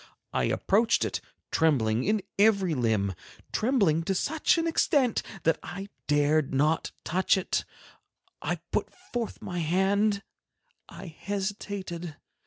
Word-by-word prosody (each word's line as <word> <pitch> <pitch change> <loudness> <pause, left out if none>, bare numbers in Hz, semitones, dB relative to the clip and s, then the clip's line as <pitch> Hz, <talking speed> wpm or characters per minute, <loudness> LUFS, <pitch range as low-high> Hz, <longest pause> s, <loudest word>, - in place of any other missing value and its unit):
I - - +1
approached 225 +4 +2
it, - - -3 0.3
trembling 125 -8 +2
in 210 -1 +1 0.2
every 200 -5 +4
limb, 110 -7 +1 0.4
trembling 210 - +2
to 195 - 0
such 315 - +2
an 330 - +1
extent 285 -6 +2 0.2
that 165 -1 +2
I 195 +5 -7 0.2
dared 145 -1 +2
not 155 +4 +2
touch 185 +3 +2
it, 190 - -1 0.8
I - - -1 0.2
put - - 0 0.2
forth 240 -2 -3
my 175 -1 -3
hand, 200 +5 +2 0.7
I - - -9
hesitated. 190 -2 -4
185 Hz, 120 wpm, -28 LUFS, 155-205 Hz, 0.8 s, every